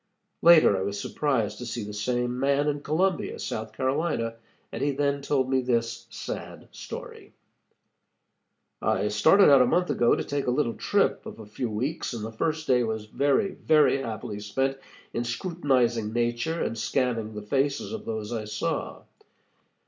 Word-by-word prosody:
Later 165 -11 +7
I 95 - -1
was 100 +1 -3
surprised 130 -3 -1
to 125 - -6
see 115 - -4
the 105 0 -7
same 120 +3 -1
man 140 +2 +2
in 145 -1 -1
Columbia, 175 +5 0
South 110 0 -4
Carolina, 130 -3 -1 0.4
and - - -5
he 145 - +2
then 140 0 0
told 140 -2 +1
me 130 0 +2
this 115 -2 -1
sad - - -7
story: - - -9 1.5
"I 105 - +1
started 160 - +6
out 135 -2 +7
a 125 - +4
month 180 +5 +1
ago 120 -1 +3
to - - -2
take 140 -2 -3
a - - +3
little 125 -2 +1
trip - - +1
of - - -8
a 110 - -9
few 115 +3 -4
weeks, 125 +8 -3
and 110 -2 -4
the 110 - -6
first 155 +7 -2
day 125 -3 +3
was 110 -2 -2
very, 140 - +1
very 150 -3 +3
happily 110 -3 -5
spent 135 +6 -1 0.3
in 120 - -1
scrutinizing 120 - 0
nature 120 +8 -1
and 115 - -3
scanning 115 -2 -1
the 105 - -6
faces 135 - -1
of 225 - -6
those 110 0 -4
I 110 -2 -3
saw. 105 - -3
125 Hz, 170 wpm, -26 LUFS, 110-145 Hz, 1.5 s, Later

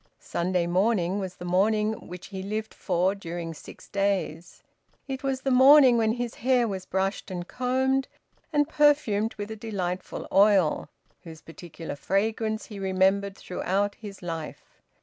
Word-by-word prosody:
Sunday 175 0 -1
morning 185 +1 +1
was 185 -2 -5
the 175 - -9
morning 210 +4 +2
which 180 +1 -9
he 190 -1 -6
lived 215 +3 -4
for 185 +1 0
during 170 -4 -6
six 155 - -13
days; 195 -4 -2 0.4
it 265 -1 -4
was 270 -1 -2
the 270 - 0
morning 260 0 +8
when 220 -1 +2
his 240 0 -3
hair 250 -1 +2
was 190 -3 -5
brushed 195 +2 -2
and 175 -1 -5
combed, 260 +1 0 0.4
and 295 -2 +2
perfumed 285 -9 +2
with 210 0 -6
a - - -4
delightful 190 -5 -4
oil, 195 -7 +4 0.3
whose 160 -3 -11
particular 165 -1 -8
fragrance 220 +6 -1
he 205 -2 -9
remembered 195 +1 +1
throughout 195 +3 -1
his 200 -4 -10
life. 160 - -7
200 Hz, 150 wpm, -26 LUFS, 180-225 Hz, 0.4 s, morning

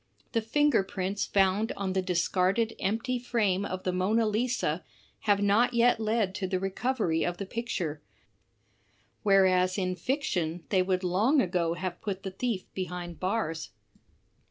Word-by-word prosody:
The 230 - +1
finger 290 +2 +3
prints 195 +1 -3
found 195 +3 +2
on 195 -2 -3
the 190 - +1
discarded 185 +5 +1
empty 230 +5 -1
frame 210 -6 0
of 185 -1 -4
the 185 - 0
Mona 210 +5 +2
Lisa 215 -7 0 0.5
have 205 0 +4
not 230 +5 +3
yet 235 0 +4
led 215 -3 0
to 190 -1 -3
the 185 0 -1
recovery 195 -3 0
of 175 0 -2
the 200 - -4
picture; 185 -9 -3 1.2
whereas 185 -2 +4
in 185 -2 -1
fiction 180 - -2
they 190 -3 +3
would 185 0 0
long 210 - +3
ago 175 -5 +1
have 180 -1 -5
put 195 -3 -4
the 190 - -4
thief 205 -1 -2
behind 180 -2 -5
bars. 185 -4 -2
195 Hz, 150 wpm, -29 LUFS, 185-225 Hz, 1.2 s, have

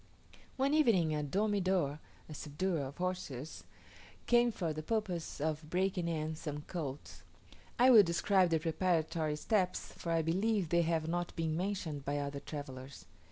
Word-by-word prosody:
One 270 +2 +2
evening 210 - +4
a 150 - 0
"domidor" 185 -3 +1 0.3
(a 155 - -8
subduer 155 +1 -2
of 140 - -11
horses) 175 -6 -4 0.6
came 240 0 +4
for 170 -7 -2
the 155 - -4
purpose 185 -2 -2
of 155 +1 -2
breaking 185 0 0
in 160 -1 -2
some 150 -2 -5
colts. 150 -6 -6 0.6
I 255 +2 +7
will 225 -4 +10
describe 185 +1 +3
the 165 - +3
preparatory 160 -1 0
steps, 185 +3 0
for 170 - -4
I 165 -1 +2
believe 190 +2 +1
they 170 +1 +4
have 165 -1 0
not 175 +1 -2
been 160 -1 -1
mentioned 175 -6 -3
by 145 +1 -1
other 140 0 -3
travellers. 140 -2 -8
165 Hz, 155 wpm, -34 LUFS, 150-190 Hz, 0.6 s, will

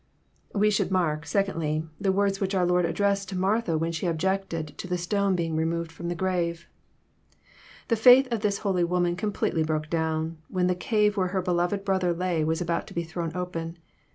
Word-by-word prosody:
We 210 +1 +3
should 200 - +1
mark, 165 -4 0
secondly, 160 -4 0
the 195 - +2
wards 195 0 +1
which 195 0 0
our 180 -1 +3
Lord 180 0 +2
addressed 200 +1 0
to 195 - -5
MartJia^ 190 -2 +1
wJien 165 0 -2
site 180 - 0
objected 170 -1 -1
to - - -5
the 180 0 -1
stone 195 +2 +1
being 165 -2 -1
removed 165 +1 -1
from 170 +1 -7
the 175 - -2
grave. 170 -2 -1 1.2
The 230 - +2
faith 250 +4 +7
of 230 - 0
this 205 -1 0
holy 185 -3 +2
woman 175 0 +1
completely 195 -4 -1
broke 155 -1 -2
down, 160 0 -1
when 180 -1 0
the 180 - +2
cave 210 +2 +1
where 185 -1 +2
her 190 +1 -1
beloved 180 +3 0
brother 190 -3 +1
lay 170 -2 0
was 160 +2 0
about 170 -1 -1
to - - -12
be 170 - 0
thrown 165 0 -5
open. 170 -2 -4
180 Hz, 195 wpm, -26 LUFS, 165-195 Hz, 1.2 s, faith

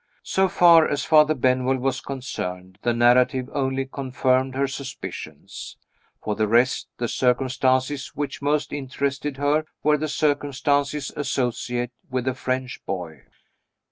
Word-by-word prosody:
So 190 0 +1
far 170 -3 +6
as 145 - -1
Father 155 -1 +5
Benwell 130 0 +2
was 130 +1 -1
concerned, 95 -8 -6
the 120 - +1
narrative 125 +2 +3
only 135 -1 -1
confirmed 130 -1 0
her 140 +1 +1
suspicions. 135 0 -8 0.5
For 105 - -1
the 110 +1 0
rest, 120 +4 +2
the 120 - -1
circumstances 130 +2 +1
which 145 -1 -4
most 145 +1 0
interested 140 0 -3
her 145 +2 +2 0.2
were 150 0 +3
the 155 - -1
circumstances 145 -1 0
associated 125 -3 -2 0.2
with 130 -1 -2
the 130 - +1
French 130 0 -3
boy. 90 -4 -5
130 Hz, 130 wpm, -24 LUFS, 125-145 Hz, 0.5 s, far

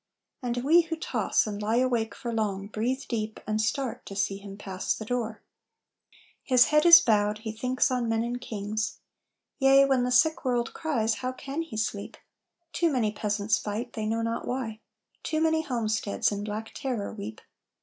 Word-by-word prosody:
And 245 -1 -2
we 325 +5 +6
who 325 0 -4
toss 320 - 0
and 210 -1 -4
lie 215 +2 0
awake 240 -4 +1
for 240 -3 -5
long 200 -3 -1
Breathe 240 +6 -2
deep, 220 -2 -3
and 215 0 0
start, 255 +3 -2
to 195 - -7
see 195 0 0
him 200 0 -10
pass 190 -2 -2
the 220 - -7
door. 225 -2 -3 1.0
His 250 -2 +5
head 300 +3 +5
is 335 0 +12
bowed. 210 -6 +2
He 220 - -2
thinks 250 +4 0
on 245 -2 0
men 225 0 +1
and 245 +1 -3
kings. 215 0 -3 0.6
Yea, 270 0 +6
when 265 -2 +2
the 250 - 0
sick 315 +7 +3
world 245 -3 0
cries, 235 -9 0
how 255 0 -1
can 275 +4 -5
he 325 -10 -7
sleep? 210 -2 -3 0.6
Too 335 -2 +2
many 235 -6 +1
peasants 210 0 0
fight, 220 +4 -4
they 215 -1 -3
know 225 +1 0
not 230 0 -2
why, 235 -4 -3 0.4
Too 310 - -1
many 320 0 +2
homesteads 220 -9 -1
in 205 0 -3
black 215 +1 -5
terror 245 -7 -3
weep. 215 0 -7
230 Hz, 180 wpm, -27 LUFS, 215-255 Hz, 1.0 s, is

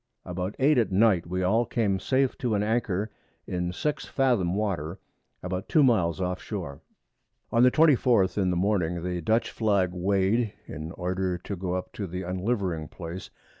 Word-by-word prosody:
About 90 +2 -4
8 140 0 +4
at 115 - +1
Night 95 -3 +3
we 90 +1 -2
all 110 +6 +3
came 110 -5 0
safe 130 +3 +1
to 120 -5 0
an 100 - +1
Anchor 105 -2 -1 0.3
in 90 -1 -2
6 150 - -2
Fathom 120 -10 +1
Water 95 -5 -2 0.5
about 90 +1 -4
2 155 -4 +5
Miles 95 -10 +2
off 90 0 -2
Shore. 85 -10 -6 0.7
On 115 - +3
the 125 - +7
24th 125 - +4
in 95 -3 +1
the 90 - 0
Morning 90 -3 0
the 90 -1 -2
Dutch 110 +8 +1
Flag 100 -5 +1
weigh'd, 100 +4 +1
in 80 +2 -7
order 90 0 -2
to 95 +3 -6
go 90 0 -3
up 95 - -5
to 100 - -4
the 90 +2 -5
unlivering 90 -3 -2
Place. 85 +2 -8
95 Hz, 170 wpm, -27 LUFS, 90-110 Hz, 0.7 s, the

